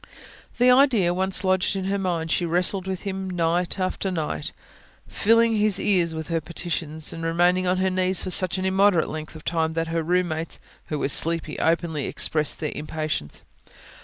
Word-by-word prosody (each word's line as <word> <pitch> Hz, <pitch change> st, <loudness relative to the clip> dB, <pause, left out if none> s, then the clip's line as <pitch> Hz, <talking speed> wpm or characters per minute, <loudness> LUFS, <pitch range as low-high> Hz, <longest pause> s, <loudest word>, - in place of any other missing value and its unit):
The 250 Hz, +1 st, +5 dB
idea 250 Hz, -9 st, +4 dB
once 190 Hz, +1 st, 0 dB
lodged 185 Hz, 0 st, +1 dB
in 190 Hz, -, -2 dB
her 200 Hz, +1 st, -1 dB
mind, 170 Hz, -4 st, -2 dB
she -, -, +1 dB
wrestled 180 Hz, +3 st, 0 dB
with 190 Hz, -1 st, -4 dB
Him 190 Hz, -1 st, -4 dB
night 175 Hz, 0 st, 0 dB
after 185 Hz, +1 st, -2 dB
night, 155 Hz, -3 st, -3 dB, 0.6 s
filling 230 Hz, +1 st, +3 dB
His 210 Hz, -2 st, +1 dB
ears 175 Hz, -5 st, +1 dB
with 160 Hz, +1 st, -6 dB
her 165 Hz, -1 st, 0 dB
petitions, 160 Hz, -1 st, -4 dB
and 165 Hz, -, -7 dB
remaining 175 Hz, +2 st, +2 dB
on 180 Hz, +1 st, +2 dB
her 190 Hz, 0 st, +1 dB
knees 185 Hz, -1 st, +1 dB
for 185 Hz, -, -4 dB
such 185 Hz, 0 st, +2 dB
an 185 Hz, -, -2 dB
immoderate 190 Hz, -2 st, +3 dB
length 155 Hz, 0 st, -7 dB
of 155 Hz, -, -12 dB
time 160 Hz, -1 st, 0 dB
that 165 Hz, 0 st, -2 dB
her 165 Hz, 0 st, -1 dB
room 180 Hz, +2 st, +1 dB
mates, 160 Hz, +1 st, -4 dB, 0.3 s
who 150 Hz, -, -3 dB
were 140 Hz, -, -1 dB
sleepy, 165 Hz, +1 st, +2 dB
openly 165 Hz, -3 st, 0 dB
expressed 155 Hz, -2 st, 0 dB
their 150 Hz, -, -3 dB
impatience. 155 Hz, -, -4 dB
175 Hz, 185 wpm, -24 LUFS, 160-190 Hz, 0.6 s, The